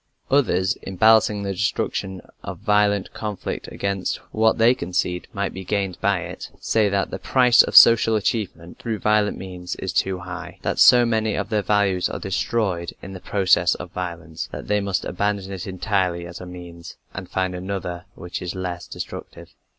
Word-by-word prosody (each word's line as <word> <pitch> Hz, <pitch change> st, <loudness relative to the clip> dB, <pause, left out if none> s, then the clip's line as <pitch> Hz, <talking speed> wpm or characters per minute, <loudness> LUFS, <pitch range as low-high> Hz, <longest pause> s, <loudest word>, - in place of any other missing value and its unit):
Others, 95 Hz, -9 st, +2 dB
in 95 Hz, -, -7 dB
balancing 110 Hz, 0 st, +4 dB
the 100 Hz, -, -2 dB
destruction 95 Hz, -1 st, -2 dB, 0.2 s
of -, -, -6 dB
violent 105 Hz, -2 st, +1 dB
conflict 105 Hz, -3 st, -5 dB
against 100 Hz, -2 st, -2 dB, 0.2 s
what 110 Hz, 0 st, +3 dB
they 115 Hz, +2 st, +5 dB
concede 90 Hz, -4 st, -2 dB
might 100 Hz, -1 st, -3 dB
be 95 Hz, -, -7 dB
gained 95 Hz, -2 st, -2 dB
by 100 Hz, -2 st, +2 dB
it, 90 Hz, +1 st, -7 dB
say 110 Hz, -2 st, +2 dB
that 100 Hz, -1 st, -1 dB
the -, -, -4 dB
price 125 Hz, -2 st, +5 dB
of -, -, -2 dB
social 115 Hz, -1 st, +8 dB
achievement 95 Hz, -5 st, -2 dB
through 115 Hz, -2 st, -3 dB
violent 105 Hz, 0 st, +2 dB
means 90 Hz, -2 st, -6 dB
is 95 Hz, -, -4 dB
too 95 Hz, -1 st, +1 dB
high 90 Hz, -1 st, -8 dB
that -, -, -1 dB
so 125 Hz, -1 st, +8 dB
many 110 Hz, -2 st, 0 dB
of -, -, -3 dB
their 105 Hz, -2 st, +1 dB
values 100 Hz, -2 st, +1 dB
are -, -, -4 dB
destroyed 95 Hz, -2 st, -1 dB
in 95 Hz, -, -8 dB
the 95 Hz, -, -7 dB
process 95 Hz, 0 st, +2 dB
of -, -, -8 dB
violence 85 Hz, -3 st, -5 dB
that -, -, -7 dB
they 105 Hz, 0 st, +2 dB
must 100 Hz, -2 st, -1 dB
abandon 100 Hz, +1 st, -2 dB
it 95 Hz, 0 st, -6 dB
entirely 95 Hz, -2 st, -1 dB
as 85 Hz, +1 st, -9 dB
a 90 Hz, -, -8 dB
means, 85 Hz, -1 st, -10 dB, 0.2 s
and 95 Hz, -1 st, -7 dB
find 95 Hz, -1 st, -1 dB
another 90 Hz, -1 st, -5 dB
which 90 Hz, +2 st, -6 dB
is 90 Hz, 0 st, -4 dB
less 90 Hz, -1 st, -5 dB
destructive. -, -, -8 dB
95 Hz, 180 wpm, -23 LUFS, 90-105 Hz, 0.2 s, social